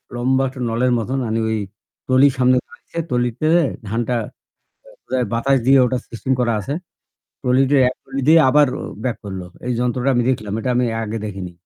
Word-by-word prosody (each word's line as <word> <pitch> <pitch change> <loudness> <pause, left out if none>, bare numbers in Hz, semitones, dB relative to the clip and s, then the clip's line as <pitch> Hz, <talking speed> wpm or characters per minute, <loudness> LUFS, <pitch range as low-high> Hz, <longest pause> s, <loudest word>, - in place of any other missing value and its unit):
লম্বা 130 +2 +1
একটা 130 0 -11
নলের 125 +2 +1
মত 115 +1 -3 0.2
মানে 115 0 -1
ওই 110 - 0 0.5
ট্রলির 130 +1 +5
সামনে 125 0 +4
দাঁড়িয়েছে। - - -15
ট্রলিতে 125 +3 0 0.4
ধানটা 115 +3 -1 0.7
বোধহয় - - -4
বাতাস 135 +4 +2
দিয়ে 135 +1 +6
ওটা 125 +1 0
সিস্টেম 125 +3 -2
করা 120 -2 +1
আছে। 140 +8 -4 0.7
ট্রলি 125 0 +3
দিয়ে 140 -2 +4
এক 130 - -6
ট্রলি 135 0 -5
দিয়ে 165 +1 +7
আবার 145 0 +5 0.4
ব্যাক 125 -3 -1
করল। 95 -2 -6 0.3
এই 125 - 0
যন্ত্রটা 125 +2 0
আমি 120 -1 +2
দেখলাম। 105 -5 -2
এটা 125 - -2
আমি 125 0 +2 0.2
আগে 110 +1 -4
দেখিনি। 95 -4 -6
125 Hz, 175 wpm, -20 LUFS, 115-135 Hz, 0.7 s, দিয়ে